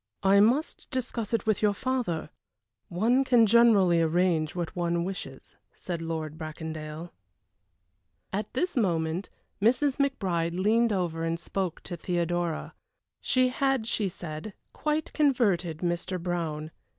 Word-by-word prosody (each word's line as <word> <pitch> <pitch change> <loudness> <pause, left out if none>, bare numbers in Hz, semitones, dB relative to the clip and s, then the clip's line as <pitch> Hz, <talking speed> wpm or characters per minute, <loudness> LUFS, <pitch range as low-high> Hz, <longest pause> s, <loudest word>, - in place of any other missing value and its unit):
"I 195 +1 +6
must 245 +9 +2
discuss 245 -4 -3
it 230 -3 0
with 215 -3 +1
your 205 -1 +3
father; 235 -13 -2 0.6
one 230 +9 +2
can 245 -3 +5
generally 205 -6 +5
arrange 165 -1 +1
what 175 +1 -3
one 170 -1 0
wishes," 170 -8 -7 0.2
said 170 -2 -5
Lord 160 -1 -4
Bracondale. 155 +1 -6 1.2
At 205 +1 -2
this 355 +8 -1
moment 170 -5 0 0.3
Mrs. 260 +5 +3
McBride 180 - 0
leaned 225 +4 +3
over 175 -4 -1
and 165 0 -1
spoke 185 -1 -3
to 175 - -5
Theodora. 175 -1 -2 0.5
She 255 0 +2
had, 270 -2 0
she 215 -2 0
said, 170 +2 -7 0.2
quite 305 0 -2
converted 200 - +1
Mr. 180 +1 -2
Brown. 165 -3 -3
180 Hz, 125 wpm, -28 LUFS, 165-230 Hz, 1.2 s, I